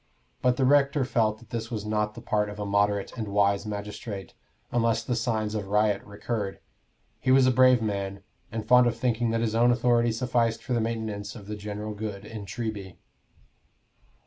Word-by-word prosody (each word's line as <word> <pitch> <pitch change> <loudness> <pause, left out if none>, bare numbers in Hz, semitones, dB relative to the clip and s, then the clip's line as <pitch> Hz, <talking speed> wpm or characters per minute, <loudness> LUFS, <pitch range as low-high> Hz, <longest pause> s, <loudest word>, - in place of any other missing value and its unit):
But 125 -1 +2
the 130 - +2
rector 140 0 +4
felt 110 -4 +1
that 115 -1 -19
this 115 -1 -3
was 110 -3 -4
not 105 0 -1
the 120 - -9
part 105 -2 0
of 105 - -8
a 105 - -2
moderate 100 0 +1
and 110 -3 -4
wise 100 0 +2
magistrate, 105 -1 -6 0.4
unless 115 -1 +1
the 120 +1 -1
signs 110 -2 -1
of 105 -2 -3
riot 105 0 +2
recurred. 100 -1 -4 0.6
He - - -2
was 130 0 +6
a 130 - +5
brave 130 -2 +5
man, 100 -2 -3 0.3
and 110 -1 -4
fond 125 0 +6
of 115 -1 -1
thinking 120 -1 0
that 115 0 0
his 110 -2 0
own 120 +2 +4
authority 120 -1 +3
sufficed 115 -1 0
for 130 - -2
the 120 - +2
maintenance 110 -3 -3
of 105 -4 -10
the 105 +1 -5
general 105 +1 -5
good 105 -1 -6
in 105 -2 -8
Treby. 105 -3 -5
110 Hz, 190 wpm, -27 LUFS, 105-120 Hz, 0.6 s, was